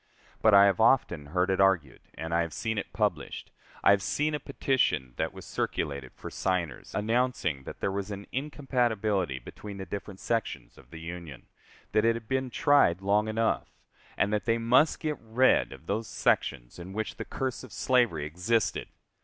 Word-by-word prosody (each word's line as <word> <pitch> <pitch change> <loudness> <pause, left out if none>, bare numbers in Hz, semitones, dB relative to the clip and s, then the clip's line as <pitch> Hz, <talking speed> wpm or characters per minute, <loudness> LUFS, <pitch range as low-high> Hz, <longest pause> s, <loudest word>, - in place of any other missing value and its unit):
But 110 -2 +6
I 100 0 +9
have 100 0 +2
often 100 - +3
heard 90 +4 +1
it 95 - +2
argued, 90 -9 +2
and 80 0 -5
I 85 - +3
have 85 -2 -3
seen 110 +3 -2
it - - -6
published: - - -2 0.3
I - - +7
have 100 -1 +4
seen 150 +8 0
a 150 - -1
petition 100 - 0
that - - -1
was - - -11
circulated 70 -3 -3
for - - -8
signers, 90 -4 -2
announcing 110 - 0
that - - -9
there - - 0
was 100 +1 -3
an 100 0 -6
incompatibility 120 - 0
between 100 +10 -9
the 95 - -5
different 100 +1 -7
sections 115 -2 -2
of 65 - -18
the 80 - -9
Union; 85 -5 -8 0.5
that 110 - +3
it 115 0 +3
had 115 -1 -7
been 130 +1 -1
tried 120 - +3
long 105 +2 +2
enough, 110 +1 0 0.5
and 100 +2 +1
that 105 - 0
they 115 -1 +2
must 125 +7 +3
get 150 -3 -2
rid 115 +3 +3
of - - -12
those 105 +5 -2
sections - - 0
in 90 +2 -8
which 110 +1 -3
the - - -4
curse 130 -1 -3
of 130 - -11
slavery 120 - +2
existed. 90 +9 0
100 Hz, 185 wpm, -29 LUFS, 85-115 Hz, 0.5 s, I